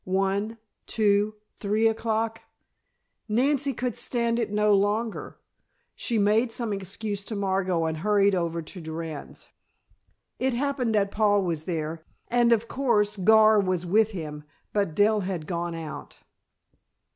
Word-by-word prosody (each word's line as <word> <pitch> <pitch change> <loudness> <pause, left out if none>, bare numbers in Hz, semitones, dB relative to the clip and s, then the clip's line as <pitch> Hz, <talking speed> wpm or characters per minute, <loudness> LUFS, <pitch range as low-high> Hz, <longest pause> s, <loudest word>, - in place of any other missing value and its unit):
One, 195 +4 -1 0.3
two, 210 -1 +2 0.2
three 215 +2 +2
o'clock! 225 0 -1 0.9
Nancy 275 +5 +2
could 250 -3 -3
stand 235 -1 0
it 230 - -1
no 210 0 +3
longer. 210 +3 0 0.6
She 235 - -2
made 215 +3 +3
some 230 -3 -1
excuse 200 +1 -4
to 220 - -4
Margot 190 -4 0
and 160 0 -2
hurried 200 +3 +3
over 170 -2 -1
to 180 +3 -8
Durand's. 160 -2 -7 0.9
It 260 -1 0
happened 260 -3 0
that 200 -1 +2
Paul 205 -2 +3
was 165 -3 -2
there, 160 -2 -3 0.3
and, 240 0 +3
of 230 0 +2
course, 225 -6 +1
Gar 215 +2 +5
was 185 -3 0
with 215 +5 +3
him; 155 -7 -6 0.3
but 200 -7 0
Dell 210 +1 +4
had 180 -5 -3
gone 170 0 -3
out. 165 -2 -8
205 Hz, 135 wpm, -26 LUFS, 185-225 Hz, 0.9 s, Gar